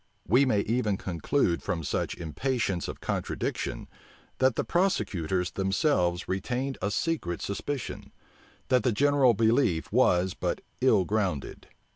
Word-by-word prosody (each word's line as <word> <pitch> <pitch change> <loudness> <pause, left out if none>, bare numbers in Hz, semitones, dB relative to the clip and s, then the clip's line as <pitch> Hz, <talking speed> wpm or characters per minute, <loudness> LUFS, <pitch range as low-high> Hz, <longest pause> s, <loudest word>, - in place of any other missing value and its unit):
We 125 - +5
may 105 -6 +2
even 110 -2 0
conclude 90 - 0
from 85 -2 -3
such - - -2
impatience 95 - -2
of - - -7
contradiction, - - -3 0.5
that 130 -2 +3
the - - 0
prosecutors 95 - 0
themselves 95 - +1
retained 125 +8 -2
a 100 - 0
secret 105 - -1
suspicion, 130 +6 -4 0.6
that 130 -2 +4
the 120 +1 +1
general 140 -1 +4
belief 110 - +2
was 95 -6 +3
but - - -2 0.2
ill 110 -8 +4
grounded. 95 -9 -2
105 Hz, 125 wpm, -28 LUFS, 90-130 Hz, 0.6 s, We